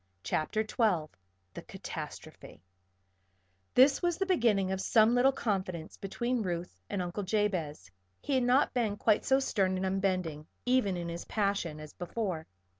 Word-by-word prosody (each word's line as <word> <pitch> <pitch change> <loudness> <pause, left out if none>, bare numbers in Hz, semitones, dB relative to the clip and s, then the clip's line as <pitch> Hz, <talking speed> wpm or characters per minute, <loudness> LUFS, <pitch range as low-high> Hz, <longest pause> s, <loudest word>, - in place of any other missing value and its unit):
CHAPTER 215 +8 0
XII 185 -10 +1 0.4
THE - - -7
CATASTROPHE - - -8 1.2
This 270 +2 +6
was 345 -2 +1
the 390 - 0
beginning 225 - +2
of 190 0 -1
some 220 +3 +4
little 250 +2 +5
confidence 185 -9 -3
between 235 +5 -2
Ruth 175 -3 -4
and 195 -3 -1
Uncle 175 +3 -4
Jabez. 185 - -1 0.3
He 285 - -3
had 260 -2 +3
not 250 +3 +3
been 225 -5 0
quite 215 -1 +2
so 265 0 +4
stern 195 -8 +1
and 190 - -1
unbending, 185 -5 -1 0.2
even 245 -7 +2
in 170 -1 -4
his 170 0 -5
passion, 200 -7 -1
as 155 -1 -10
before. 180 -3 -4
200 Hz, 150 wpm, -31 LUFS, 175-240 Hz, 1.2 s, This